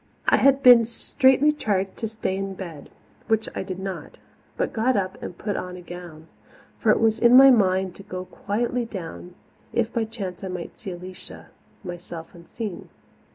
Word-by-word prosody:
I - - +5
had 275 0 +4
been 245 -2 +9
straitly 265 +5 +3
charged 200 -9 -1
to 225 - -2
stay 215 -3 -3
in 195 0 -4
bed, 170 -6 -8 0.4
which 220 0 +1
I - - -3
did 185 -1 -5
not, 190 0 -6 0.4
but - - -1
got 240 +2 +2
up 190 -1 -3
and 175 - -7
put 205 -1 -3
on 180 0 -5
a - - -9
gown. 175 -2 -10 0.5
For 225 - +1
it - - +5
was 225 -1 +2
in 240 +1 +7
my 270 0 +10
mind 190 -5 +2
to - - -10
go 185 -1 -6
quietly 235 +6 -2
down, 180 -4 -8 0.4
if 235 -1 0
by 230 -1 0
chance 200 -5 -6
I - - -3
might 180 -1 -4
again - - -14
see 215 -6 -7
Alicia, 180 +1 -9 0.3
myself 175 -2 -8
unseen. 175 +3 -7
195 Hz, 185 wpm, -24 LUFS, 180-230 Hz, 0.5 s, my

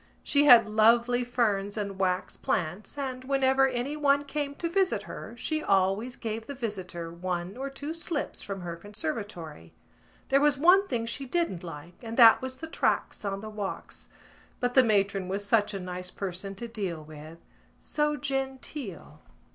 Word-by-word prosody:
She 290 0 +3
had 245 -5 +9
lovely 235 +3 +4
ferns 215 -5 0
and 200 -2 -4
wax 185 -1 0
plants 180 - -2
and, 260 -2 -4
whenever 270 0 +3
anyone 280 +3 +1
came 285 0 -3
to 335 - -2
visit 375 +2 +1
her, 230 - -8
she 310 +6 -2
always 195 +3 +1
gave 225 -1 -5
the 280 - -6
visitor 180 -8 -5
one 175 +2 -3
or 270 +2 -4
two 285 +3 -6
slips 330 -2 -3
from 195 -2 -5
her 170 -1 -5
conservatory. 205 - -6 0.5
There 275 +1 +4
was 295 -1 +4
one 365 +7 +6
thing 235 -6 -1
she 270 +4 -5
didn't 270 - -1
like 165 0 -9
and 230 -1 -6
that 230 -3 +8
was 260 0 -4
the 320 +5 -7
tracts 320 - 0
on 195 -1 -3
the 215 - -7
walks; 210 -2 -6 0.5
but 245 0 0
the 260 - +8
matron 200 -4 +1
was 200 +2 -3
such 210 0 +3
a 200 - -4
nice 180 0 -5
person 195 +1 -5
to 235 +5 -6
deal 195 -8 -4
with, 155 +1 -11 0.4
so 300 0 0
genteel. 270 - -5
225 Hz, 165 wpm, -28 LUFS, 190-270 Hz, 0.5 s, had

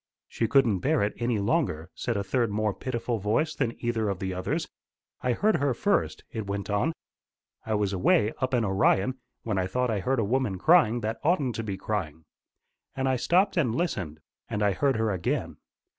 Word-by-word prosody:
"'She 115 - -1
couldn't 115 -6 +3
bear 145 - +2
it 105 - 0
any 120 -1 0
longer,' 100 - 0
said 120 -3 -2
a 100 - -1
third 115 +3 0
more 105 0 0
pitiful 120 -1 -3
voice 115 +11 0
than 130 -5 -1
either 115 -3 0
of 100 - -2
the 95 +1 -3
others. 90 0 -2 0.5
'I 125 - +1
heard 210 - +2
her 140 -3 0
first,' 200 - 0
it 110 -3 -5
went 100 0 -3
on. 105 +11 +1 0.8
'I 110 - +1
was 100 -1 0
away 105 +3 +3
up 130 0 0
in 115 -2 +1
Orion, 100 +5 +2 0.2
when 105 -4 -1
I 90 - 0
thought 125 +5 0
I 105 - 0
heard 130 +8 0
a 115 - +2
woman 120 -3 0
crying 120 - +4
that 110 +1 -3
oughtn't 145 -6 +2
to 115 - -2
be 100 -3 -4
crying. 85 -7 -3 0.7
And 135 0 -1
I 130 - +2
stopped 185 - +2
and 125 -9 +2
listened. 95 - -2 0.3
And 105 - -1
I 100 - +3
heard 135 +7 +1
her 110 -1 +1
again. 90 -3 -2
115 Hz, 200 wpm, -27 LUFS, 100-130 Hz, 0.8 s, crying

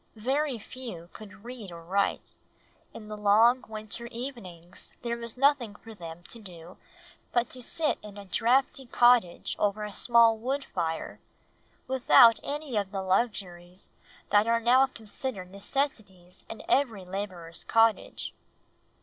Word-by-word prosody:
Very 265 +4 0
few 215 -7 -9
could 205 0 -13
read 240 -6 -8
or 170 -1 -10
write; 195 +4 -1 0.6
in 215 - -10
the 215 - -6
long 220 +5 +4
winter 215 +2 -4
evenings 230 -9 -9
there 235 -1 -1
was 235 0 -6
nothing 265 -6 +2
for 225 +2 -12
them 170 -3 -9
to 235 - -8
do 175 -3 -12 0.5
but 240 0 +1
to 255 - -6
sit 305 +5 0
in 205 -1 -11
a 200 - -9
draughty 255 +5 +1
cottage 240 -7 +3
over 210 +1 0
a 210 -1 -6
small 230 -1 +4
wood 270 +4 -2
fire, 165 -3 -3 0.7
without 245 -3 +6
any 290 -3 -5
of 200 -2 0
the 195 -2 -3
luxuries 185 -3 -2 0.4
that 205 +2 +4
are 230 0 +3
now 255 +3 +5
considered 220 -5 -7
necessaries 200 -5 -4
in 225 - -8
every 255 - +1
labourer's 180 -3 -6
cottage. 225 -1 +1
220 Hz, 140 wpm, -28 LUFS, 190-245 Hz, 0.7 s, without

